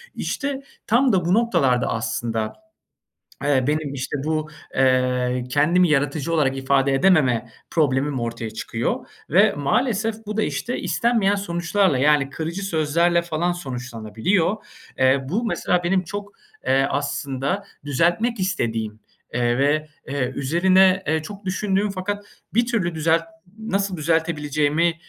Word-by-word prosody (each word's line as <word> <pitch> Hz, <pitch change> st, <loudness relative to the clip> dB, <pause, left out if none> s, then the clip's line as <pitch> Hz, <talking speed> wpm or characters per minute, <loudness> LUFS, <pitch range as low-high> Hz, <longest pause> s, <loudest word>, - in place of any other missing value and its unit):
işte, 285 Hz, -2 st, -3 dB, 0.3 s
tam 245 Hz, +2 st, +3 dB
da 180 Hz, -3 st, +2 dB
bu 175 Hz, -, +2 dB
noktalarda 140 Hz, -, +2 dB
aslında, 115 Hz, 0 st, -2 dB, 0.9 s
eee, 140 Hz, -3 st, +2 dB
benim 150 Hz, -1 st, -1 dB
işte 135 Hz, +2 st, -3 dB
bu, 155 Hz, 0 st, -1 dB, 0.2 s
eee, 125 Hz, -1 st, +2 dB
kendimi 170 Hz, +6 st, +3 dB
yaratıcı 145 Hz, +2 st, 0 dB
olarak 135 Hz, -4 st, +2 dB
ifade 135 Hz, 0 st, +2 dB
edememe 135 Hz, -7 st, +3 dB, 0.2 s
problemim 140 Hz, -3 st, +1 dB
ortaya 115 Hz, -1 st, -4 dB
çıkıyor. 115 Hz, +1 st, -3 dB, 0.2 s
Ve -, -, +5 dB
maalesef 220 Hz, -, 0 dB
bu 210 Hz, 0 st, -4 dB
da, 220 Hz, -, +2 dB
işte, 245 Hz, -, -2 dB
istenmeyen 225 Hz, -4 st, +2 dB
sonuçlarla, 175 Hz, -3 st, +1 dB
yani, 145 Hz, 0 st, +3 dB
kırıcı 165 Hz, +6 st, -4 dB
sözlerle 170 Hz, 0 st, +2 dB
falan 170 Hz, +1 st, -1 dB
sonuçlanabiliyor. 130 Hz, -, -1 dB, 0.4 s
Eee, 130 Hz, +1 st, +3 dB
bu 215 Hz, -, -1 dB
mesela 180 Hz, -5 st, 0 dB
benim 185 Hz, +1 st, +2 dB
çok, 205 Hz, +3 st, -6 dB, 0.3 s
eee, 135 Hz, +1 st, +3 dB
aslında 140 Hz, +5 st, -2 dB, 0.2 s
düzeltmek 175 Hz, -, +1 dB
istediğim, 115 Hz, -, -2 dB, 0.3 s
eee, 120 Hz, 0 st, +1 dB
ve, 150 Hz, +3 st, +1 dB, 0.2 s
eee, 135 Hz, -2 st, -1 dB
üzerine, 185 Hz, +6 st, +4 dB
eee, 160 Hz, 0 st, +1 dB
çok 200 Hz, +5 st, -9 dB
düşündüğüm 195 Hz, +2 st, 0 dB
fakat 205 Hz, +2 st, -4 dB, 0.3 s
bir 235 Hz, +2 st, +3 dB
türlü 200 Hz, -8 st, -1 dB
düzelt 160 Hz, +1 st, +2 dB, 0.4 s
nasıl 200 Hz, -3 st, -1 dB
düzeltebileceğimi, 155 Hz, 0 st, +1 dB
155 Hz, 125 wpm, -22 LUFS, 135-190 Hz, 0.9 s, Ve